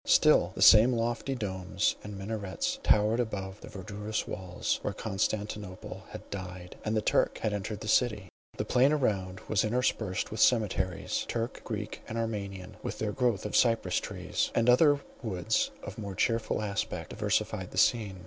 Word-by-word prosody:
Still - - +5
the - - +2
same 115 +4 +8
lofty 120 +3 -1
domes 95 -6 -1
and 105 -1 -7
minarets 100 -1 -3
towered 105 +3 +3
above 100 -4 -3
the - - -10
verdurous 105 +3 -4
walls, 90 -2 -2
where - - -3
Constantine 105 -2 -2 0.3
had - - -9
died, 90 -2 -7
and 110 +1 0
the 105 - 0
Turk - - +2
had 105 - +1
entered 105 +1 -4
the 110 - -6
city. 105 -3 +2 0.3
The - - -1
plain 130 +4 +4
around 95 -10 0
was 110 -1 +1
interspersed 110 -4 0
with 110 - -5
cemeteries, 105 -7 +2
Turk, 115 +1 -3
Greek, 105 -2 -5
and 115 - -4
Armenian, 100 -5 -4
with - - -4
their 105 -1 -1
growth 120 -4 0
of 105 - -3
cypress 115 -2 +3
trees; - - -2
and 120 +1 +5
other 145 +2 +5 0.2
woods 110 -2 0
of 100 +2 -7
more 100 -3 -5
cheerful 115 0 0
aspect, 100 -2 -3
diversified - - -1
the - - -10
scene. 105 -5 +2
105 Hz, 165 wpm, -30 LUFS, 95-115 Hz, 0.3 s, same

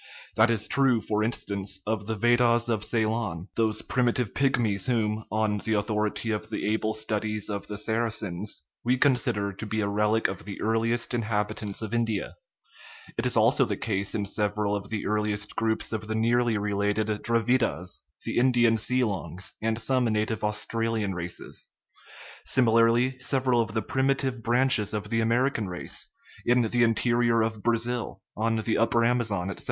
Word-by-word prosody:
That 110 +2 +5
is 110 -2 +1
true, 135 -4 +3
for 105 0 -1
in 115 - +1
stance, 100 -3 -4
of 105 -1 -2
the 110 - -1
Veddahs 120 +1 +3
of 110 -3 0
Ceylon, 110 -6 -1
those 110 -2 0
primitive 125 -3 0
pyg 135 -1 +2
mies 100 -5 0
whom, 110 -3 0
on 105 -1 +1
the 110 - -2
authority 105 +2 -1
of 105 - -3
the - - -3
able 110 0 -1
studies 110 -1 -2
of 100 -1 -4
the 105 - -5
Sarasins, 110 -4 -2 0.2
we 125 +2 +2
consider 120 -7 +1
to 100 - -7
be 110 +1 -2
a 105 - 0
relic 105 +2 +2
of - - -6
the 100 - -7
earliest 115 +2 0
in 120 - +1
habitants 105 -1 -2
of 110 +1 -5
India 115 -3 -1 0.4
;* 450 0 -18
it - - 0
is 125 - 0
also 125 +6 +5
the 105 -5 -2
case 100 -3 -2
in 105 -2 -1
several 105 0 -1
of 100 -1 -5
the 110 -2 -3
earliest 105 -1 -1
groups 110 0 0
of 110 -1 -3
the 110 - -2
nearly 115 0 +2
related 105 +1 0 0.2
Dravidas, 115 - 0 0.2
the - - 0
Ind 125 0 +3
ian 115 -1 +4
Seelongs, 100 -7 -1
and 110 0 0
some 130 0 +1
native 110 -1 -1
Australian 110 0 -1
races. 85 0 -5 0.8
Sim 130 -2 +2
ilarly, 115 +3 +3
several 130 -3 +2
of 110 -1 -4
the 110 - 0
primitive 130 -2 0
branches 120 -3 +3
of 105 0 -4
the 115 - +2
Ameri 120 +5 +2
can 105 -3 -2
race, 90 - -4 0.4
in 120 0 +3
the 120 +2 +1
interior 115 0 +3
of 110 -1 -3
Brazil, 120 -1 -1 0.2
on 115 +1 0
the 110 0 0
upper 115 +1 +3
Amazon, 110 -7 0
etc. - - -6
110 Hz, 175 wpm, -27 LUFS, 105-120 Hz, 0.8 s, That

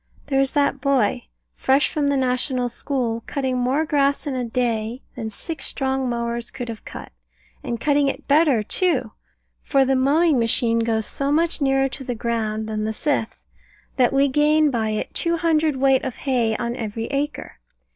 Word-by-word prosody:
There 270 -1 0
is 270 -1 +2
that 280 -2 +1
boy, 255 -3 +1 0.3
fresh 270 +2 +2
from 295 -2 -1
the 280 -1 +2
National 255 -1 0
School, 235 -2 -2
cutting 260 -3 -1
more 265 +6 +1
grass 285 -1 +1
in 285 - -2
a 255 -1 -2
day 235 0 -2
than 220 - -4
six 310 +9 -6
strong 265 -1 -1
mowers 235 0 -3
could 245 -3 -6
have 225 -2 -7
cut, - - -9 0.5
and 240 -4 -3
cutting 285 +1 +2
it 275 - -4
better, 285 -6 +4
too; 260 - 0 0.5
for 275 -2 +2
the 265 0 +2
mowing 285 +2 +3
machine 230 0 +2
goes 225 -1 0
so 275 +5 -2
much 325 +1 +1
nearer 270 -1 +3
to 270 +1 -7
the 245 -2 -3
ground 220 -2 -2
than 215 -1 -2
the 220 +1 -2
scythe, 275 -2 -2 0.5
that 250 -2 +4
we 275 +1 +3
gain 300 +2 +3
by 225 -3 0
it 215 0 -3
two 335 0 0
hundredweight 305 -5 +2
of 260 -3 -4
hay 240 -5 0
on 240 0 -3
every 225 -1 -4
acre. 290 +2 -3
260 Hz, 175 wpm, -22 LUFS, 235-285 Hz, 0.5 s, better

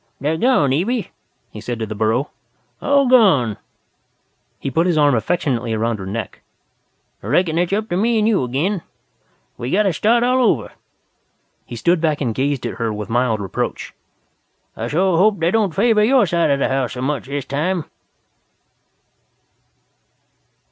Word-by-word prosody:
"They're 150 +3 -1
gone, 160 - +2
Evie," 205 - -1 0.4
he 105 - -9
said 120 +2 -4
to 110 - -3
the 110 - -6
burro, 110 +6 0 0.5
"all 280 -1 +3
gone." 175 - +4 1.0
He 135 - -4
put 165 +7 +1
his 170 -3 +1
arm 145 -2 +4
affectionately 120 -3 -1
around 115 0 -1
her 95 - -6
neck. 110 +3 -5 0.8
"I - - -9
reckon 170 -2 +1
it's 175 +1 0
up 215 +2 -1
to 175 - -1
me 230 +3 +1
and 215 0 +2
you 215 -11 +2
agin. 160 +10 -1 0.8
We 120 - -4
got 205 +8 +2
to 195 -3 +1
start 235 +8 +2
all 250 +1 +2
over." 160 - +1 1.0
He - - -7
stood 170 +8 +1
back 155 -3 0
and 120 -6 -1
gazed 135 +2 -1
at - - -4
her 115 -2 -1
with 105 +1 -6
mild 120 -2 +1
reproach. 95 - -4 0.8
"I 115 - -4
shore 175 +5 +1
hope 200 0 +3
they 165 +1 +1
don't 210 -6 0
favor 210 +1 +3
your 250 +1 +4
side 170 -1 +1
of 140 - +2
the 140 - 0
house 135 -2 -1
so 125 - -5
much 140 0 -2
this 140 -1 -4
time." 160 +4 -2
155 Hz, 170 wpm, -19 LUFS, 125-200 Hz, 1.0 s, gone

